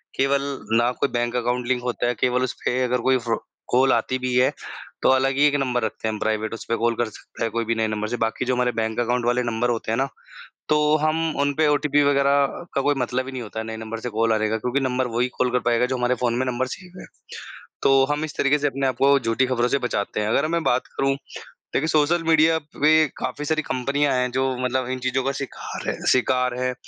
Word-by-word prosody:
केवल 135 +1 +2 0.4
ना 120 +1 +3
कोई - - +1
बैंक 120 0 -1
अकाउंट 125 0 -1
लिंक 125 -1 +1
होता 120 -1 -1
है, 120 - +1
केवल 125 +3 +1
उस 130 - -2
पे 125 +1 +1
अगर 125 0 +1
कोई 130 +1 +3
फ्रो 115 -1 -1 0.3
कॉल 130 +1 +4
आती 130 - 0
भी 130 0 -2
है 125 +1 +4 0.5
तो - - +3
अलग 130 0 +3
ही 145 - +5
एक 145 - +1
नंबर 125 -3 0
रखते 110 - -3
हैं 110 - -1
हम 105 - -5
प्राइवेट, 110 0 -1
उस 115 - -6
पे 115 - 0
कॉल 115 0 +1
कर 120 - 0
सकते 110 - -9
हैं 115 - -1
कोई 115 0 -1
भी 115 +1 0
नए 110 -1 0
नंबर 110 0 -2
से। 120 +2 -3
बाकी 115 +3 -1
जो 125 0 +1
हमारे 125 0 +1
बैंक 110 0 -2
अकाउंट 120 0 0
वाले 120 +1 +2
नंबर 120 +1 -1
होते 115 -2 -2
हैं 115 - 0
ना, 135 - +1 0.6
तो 150 0 +3
हम 155 +1 0
उन 145 0 +2
पे 155 +1 +2
ओटीपी 145 0 +2
वग़ैरह 140 0 +3 0.3
का 135 - +1
कोई 145 +2 +2
मतलब 125 +1 -1
ही 135 - -7
नहीं 130 -2 -5
होता 110 0 -8
है, 110 - -5
नए 110 - -5
नंबर 110 0 -6
से 125 - -4
कॉल 115 +1 +1
आ 110 - +3
रहेगा 110 +1 0
क्योंकि 125 +5 -1
नंबर 130 -1 0
वही 125 +1 +2
कॉल 125 - +2
कर 125 - +3
पाएगा 120 +1 +3
जो 130 - -2
हमारे 125 0 +1
फ़ोन 120 -1 +1
में 130 - 0
नंबर 125 +1 -1
सेव 180 +6 -9
है। - - -10 0.8
तो 135 0 +5
हम 150 +1 0
इस 155 - -7
तरीके 140 +1 +2
से 145 - 0
अपने 135 -1 -1
आप 130 - -1
को 140 +2 +4
झूठी 115 +2 +1
खबरों 125 -1 +1
से 140 - +1
बचाते 105 -5 -2
हैं। 105 - -1
अगर 140 +7 +2
मैं 170 0 0
बात 125 +1 +1
करूँ 135 0 +1 0.6
देखिए 155 - +1
सोशल 160 +2 +2
मीडिया 160 0 +4 0.2
पे 155 +1 +5
काफ़ी 150 - -4
सारी 155 +1 +1
कंपनियाँ 140 +3 0
हैं 125 0 0
जो 130 +1 0 0.2
मतलब 125 0 0
इन 130 0 -3
चीज़ों 130 +1 -1
का 135 - 0
शिकार 135 -1 -6
हैं - - -1 0.2
शिकार 125 0 +2
हैं 125 0 0
125 Hz, 255 wpm, -23 LUFS, 120-140 Hz, 0.8 s, ही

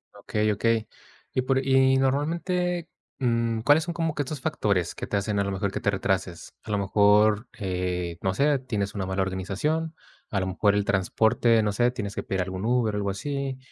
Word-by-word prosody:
Okey 105 0 -1
okey, 110 +1 +1 0.5
y 130 - +1
por 130 +1 +1
y 130 0 +4
normalmente, 170 +6 0 0.3
mm, 115 -3 0
¿cuáles 145 +6 +4
son 170 0 -5
como 165 -2 -1
que 150 - -2
estos 145 0 -5
factores 100 - 0
que - - -6
te 105 - 0
hacen 100 0 -1
a 100 - +2
lo 100 - -2
mejor 95 +1 -2
que - - -3
te - - 0
retrases? 95 -3 -2
A - - -12
lo 105 - +1
mejor, 105 +2 +3
eh, 90 -3 -2
no 95 - 0
sé, 140 +3 +3
tienes 105 -6 -3
una 95 -2 -3
mala 95 0 0
organización, 100 - -2 0.3
a 100 - 0
lo 95 - -1
mejor 100 +2 +2
el 105 -1 +1
transporte, 110 +4 +2
no 105 - +1
sé, 120 +4 +2
tienes 105 -5 -5
que - - -3
pedir 95 -1 -2
algún 95 +1 -5
Uber 115 -2 +1
o - - -2
algo 100 -1 -1
así, 140 +5 -3
110 Hz, 205 wpm, -26 LUFS, 100-135 Hz, 0.5 s, y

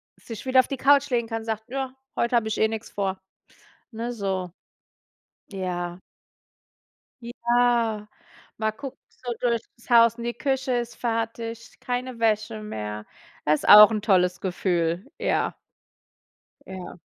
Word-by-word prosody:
sich 225 +2 -9
wieder 260 0 +5
auf - - -11
die 275 - -3
Couch 280 +1 +4
legen 235 -2 0
kann 225 0 -3
und - - -11
sagt: 220 -1 -3
„Ja, 265 0 -3 0.2
heute 235 +1 0
habe 220 -1 0
ich 220 - -2
eh 220 - +4
nix 225 0 -5
vor”, 195 -2 -2 0.7
ne, 235 +2 -4
so. 190 -5 -3 1.0
Ja. 180 -2 -4 1.2
Ja, 235 -3 +1 0.5
mal 220 -1 -1
gucken 270 +3 -8
so 245 -1 -7
durch 235 -2 +1 0.2
das 235 - -21
Haus 230 -1 +6
und 235 - -7
die 240 - -2
Küche 265 -2 -1
ist 240 -1 -2
fertig, 230 0 -4
keine 250 -1 -4
Wäsche 220 0 0
mehr. 105 - -6 0.4
Ist 150 0 +1
auch 210 +1 +11
'n 210 -1 -2
tolles 180 -4 +2
Gefühl, 175 -1 -1
ja. - - 0 1.1
Ja. 185 -2 -8
225 Hz, 145 wpm, -25 LUFS, 195-240 Hz, 1.2 s, auch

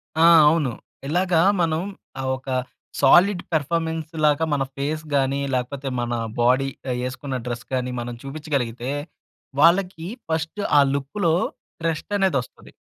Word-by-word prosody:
ఆ! 160 - +5 0.2
అవును. 150 -5 +1 0.4
ఇలాగ 180 +4 0 0.3
మనం 160 -1 +1 0.4
ఆహ్, 130 - -2
ఒక 130 - -20 0.5
సాలిడ్ 175 +7 +5
పెర్ఫార్మన్స్‌ 160 +1 -1
లాగా 150 +2 +3
మన 140 - +1
ఫేస్ 155 +3 -2
గాని 135 0 +1
లేకపోతే 135 +2 -2
మన 120 - -3 0.3
బాడీ 130 +3 +3 0.2
ఆహ్, 125 - -1
యేసుకున్న 130 +1 -4
డ్రెస్ 120 0 -4
గాని 125 0 -1
మనం 120 +1 -5
చూపిచ్చగలిగితే 135 -4 -3 0.7
వాళ్ళకి 175 0 +3 0.2
ఫస్ట్ 160 +5 -2 0.2
ఆ - - +8
లుక్‌లో 160 +5 0 0.5
ట్రస్ట్‌ 165 +5 -2
అనేదోస్తది. 155 -11 -1
145 Hz, 125 wpm, -23 LUFS, 130-165 Hz, 0.7 s, ఆ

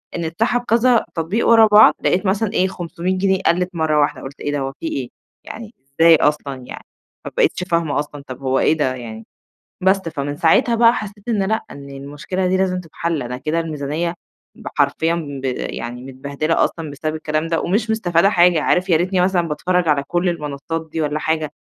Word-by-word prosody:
إن 170 - -3
اتسحب 225 +9 0
كذا 235 +1 +3
تطبيق 170 +8 -1
ورا 225 -1 +7
بعض، 210 +1 +7
لقيت 185 +3 +1
مثلًا 200 +2 0
إيه، 185 - +2
500 180 0 -3
جنيه 190 0 +1
قَلِّت 180 +2 +2
مرّة 155 -2 +1
واحدة، 145 - 0
قُلت 135 +2 -9
إيه 145 - -3
ده، 145 - -1
هو 135 0 -3
في 165 - -4
إيه؟! 130 -5 -3 0.3
يعني 225 +1 -9 0.3
إزاي 165 0 +8
أصلًا 145 -2 0
يعني؟ - - -9 0.4
ما - - -5
بقيتش 410 - +2
فاهمة 170 -5 0
أصلًا، 145 -1 -6
طَب 130 +1 -8
هو 135 0 +1
إيه - - +3
ده 130 -3 0
يعني؟ 115 -2 -8 0.6
بس، 190 +1 +5
فمن 145 -2 -4
ساعتها 170 +9 +3
بقى 230 0 +5
حسّيت 205 +1 -7
إن 210 -4 +1
لأ، 220 +3 -1
إن 140 0 -10
المشكلة 145 +7 -4
دي 185 +1 +2
لازم 185 -1 0
تتحَل، 165 -1 -3
أنا 125 +1 -5
كده 155 +5 -1
الميزانية 160 +2 -3 0.4
ب - - -15
حرفيًا 145 +4 +2 0.3
ب - - -11
يعني 120 +1 -5
متبهدلة 140 +4 -1
أصلًا 160 -3 -4
بسبب 155 +2 -4
الكلام 155 0 -2
ده 165 -1 0
ومش 215 +5 0
مستفادة 190 -3 +2
حاجة، 175 -4 +4
عارف 180 +1 +1
ياريتني 180 +2 +2
مثلًا 180 -2 +1
باتفرّج 175 +3 0
على 145 -2 +2
كل 175 +1 0
المنصّات 160 0 -4
دي 160 - -3
والّا 150 0 -1
حاجة، 155 -1 -1
165 Hz, 195 wpm, -19 LUFS, 145-190 Hz, 0.6 s, إزاي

